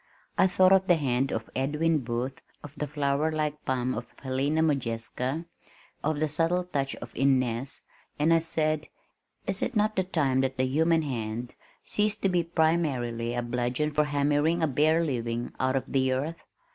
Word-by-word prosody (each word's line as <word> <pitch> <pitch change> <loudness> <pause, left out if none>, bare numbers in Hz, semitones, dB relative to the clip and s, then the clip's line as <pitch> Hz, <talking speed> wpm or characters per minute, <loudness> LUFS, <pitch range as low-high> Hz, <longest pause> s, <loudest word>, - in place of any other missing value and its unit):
I - - +5
thought 185 0 +4
of 190 0 +4
the 175 - +6
hand 135 -3 0
of 110 0 -3
Edwin 150 +4 +1
Booth, 125 +1 -3 0.2
of 145 -2 -9
the 150 0 -3
flower 145 +1 0
like 150 -1 -2
palm 130 -1 0
of - - -5 0.2
Helena 140 +4 +1
Modjeska, 130 +1 -1 0.6
of 150 0 0
the 155 - +2
subtle 165 +4 +1
touch 140 -6 -2
of 120 - -10
Inness, 130 -1 +1 0.3
and 155 +3 +3
I 165 - +5
said, 155 -1 -1 0.6
"Is - - -2
it 255 - -1
not 215 0 +2 0.2
time 135 -5 +2
that 130 0 -1
the 130 - +2
human 160 +4 +2
hand 120 -3 -4 0.3
ceased 210 0 -1
to 195 - +4
be 180 -1 +2
primarily 145 -9 0
a 120 - -1
bludgeon 125 +5 -1
for 150 0 +2
hammering 145 +3 +1
a - - +4
bare 155 +4 +3
living 120 -5 -2
out 130 0 +1
of 135 - -2
the 130 -1 +2
earth? 150 +6 -3
145 Hz, 170 wpm, -28 LUFS, 130-160 Hz, 0.6 s, the